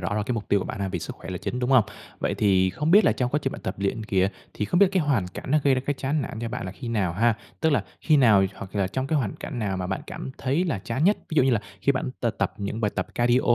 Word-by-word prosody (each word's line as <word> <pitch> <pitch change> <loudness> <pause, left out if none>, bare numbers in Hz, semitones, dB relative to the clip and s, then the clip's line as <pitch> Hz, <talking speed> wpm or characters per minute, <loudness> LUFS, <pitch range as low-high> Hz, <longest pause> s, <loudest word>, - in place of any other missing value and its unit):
rõ 90 +2 -2
là 105 - 0
cái 105 - -2
mục 110 -3 -4
tiêu 100 - +3
của - - -3
bạn - - -5
nà 100 - -1
vì - - -3
sức - - -6
khỏe - - -9
là 90 - -3
chính, 125 - -3
đúng 125 +1 -1
hông? 130 -5 +6 0.3
Vậy - - -1
thì 95 -3 +3
không 150 - -1
biết 205 +4 +7
là - - +5
trong 125 -1 -1
quá 150 - +2
trình 135 - -1
bạn - - -8
tập 95 - -3
luyện 100 +3 -1
kìa, 95 -2 +2 0.3
thì - - -1
không 175 - +1
biết 200 - +8
cái 185 -3 +3
hoàn 135 -11 +1
cảnh 100 - -8
nó 155 - +5
gây 140 -2 +5
ra 130 - 0
cái 145 - +1
chán 140 +3 -1
nản 115 - -6
cho 115 - -2
bạn 125 -4 -4
là 95 - -5
khi 95 +6 -7
nào 100 -7 0
ha? 115 +5 +3 0.3
Tức 160 - +3
là 125 -9 +2 0.2
khi 155 - +4
nào 110 -8 +6
hoặc 95 0 -9
là 100 -2 +2
trong 130 +8 -2
cái 155 +1 +1
hoàn 115 -8 -2
cảnh 135 - -6
nào 100 -4 -1
mà 90 0 -3
bạn 95 +1 -2
cảm - - -6
thấy 140 +7 +1
là 155 - -1
chán 120 +8 -2
nhất? 205 +3 +5
Ví - - -3
dụ 155 - +5
như 135 - +3
là 115 -4 +2 0.2
khi 140 - +3
bạn 130 0 -2
t - - 0
tập - - 0
những 100 +2 -3
bài 105 -2 +1
tập - - -1
cardio, 120 +1 +3
120 Hz, 330 wpm, -25 LUFS, 100-135 Hz, 0.3 s, biết